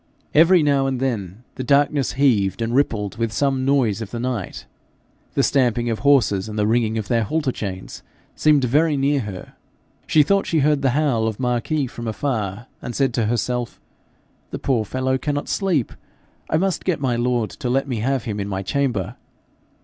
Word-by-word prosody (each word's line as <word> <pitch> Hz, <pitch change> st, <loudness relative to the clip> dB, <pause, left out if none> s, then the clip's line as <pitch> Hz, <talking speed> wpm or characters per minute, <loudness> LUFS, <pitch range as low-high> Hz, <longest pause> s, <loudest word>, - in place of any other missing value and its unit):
Every 165 Hz, +2 st, +6 dB
now 140 Hz, -2 st, +2 dB
and 130 Hz, -2 st, -2 dB
then 110 Hz, -5 st, -3 dB
the 130 Hz, -, -3 dB
darkness 140 Hz, 0 st, +2 dB
heaved 115 Hz, -7 st, +2 dB
and 115 Hz, +1 st, -2 dB
rippled 115 Hz, -7 st, 0 dB
with 115 Hz, -1 st, -1 dB
some 135 Hz, +1 st, 0 dB
noise 125 Hz, -6 st, +2 dB
of 110 Hz, -, -5 dB
the 115 Hz, -, -5 dB
night. 120 Hz, -6 st, -4 dB, 0.7 s
The -, -, +3 dB
stamping 120 Hz, -3 st, +1 dB
of 110 Hz, -, -2 dB
horses, 110 Hz, -8 st, +3 dB
and 105 Hz, -, -6 dB
the 105 Hz, -, +2 dB
ringing 110 Hz, 0 st, +1 dB
of 110 Hz, -, -3 dB
their 115 Hz, -1 st, +2 dB
halter 140 Hz, +5 st, -1 dB
chains, 95 Hz, -5 st, -6 dB, 0.3 s
seemed 150 Hz, -3 st, +3 dB
very 150 Hz, +5 st, +2 dB
near 140 Hz, +1 st, +2 dB
her. 105 Hz, -6 st, -7 dB, 0.5 s
She 155 Hz, -, +5 dB
thought 195 Hz, +6 st, +1 dB
she 160 Hz, -3 st, +1 dB
heard 150 Hz, 0 st, +2 dB
the 135 Hz, -1 st, +1 dB
howl 130 Hz, -8 st, +1 dB
of 110 Hz, -2 st, -4 dB
Marquis 125 Hz, +4 st, 0 dB
from 120 Hz, -1 st, -7 dB
afar, 110 Hz, -2 st, -3 dB, 0.2 s
and 120 Hz, -, -6 dB
said 135 Hz, -3 st, +1 dB
to 115 Hz, -2 st, 0 dB
herself, 120 Hz, +1 st, -2 dB, 0.7 s
'The -, -, -5 dB
poor 120 Hz, -5 st, 0 dB
fellow 130 Hz, +3 st, -1 dB
cannot 145 Hz, +1 st, -2 dB
sleep! 180 Hz, -, 0 dB, 0.6 s
I 155 Hz, -, +2 dB
must 190 Hz, +2 st, 0 dB
get 180 Hz, -5 st, 0 dB
my 130 Hz, -3 st, 0 dB
lord 120 Hz, -2 st, 0 dB
to 125 Hz, -, -5 dB
let 135 Hz, +2 st, +1 dB
me 125 Hz, -4 st, -2 dB
have 130 Hz, +2 st, 0 dB
him 105 Hz, -2 st, -4 dB
in 100 Hz, -, -3 dB
my 95 Hz, -1 st, -3 dB
chamber.' 125 Hz, -6 st, -1 dB
125 Hz, 190 wpm, -21 LUFS, 110-140 Hz, 0.7 s, Every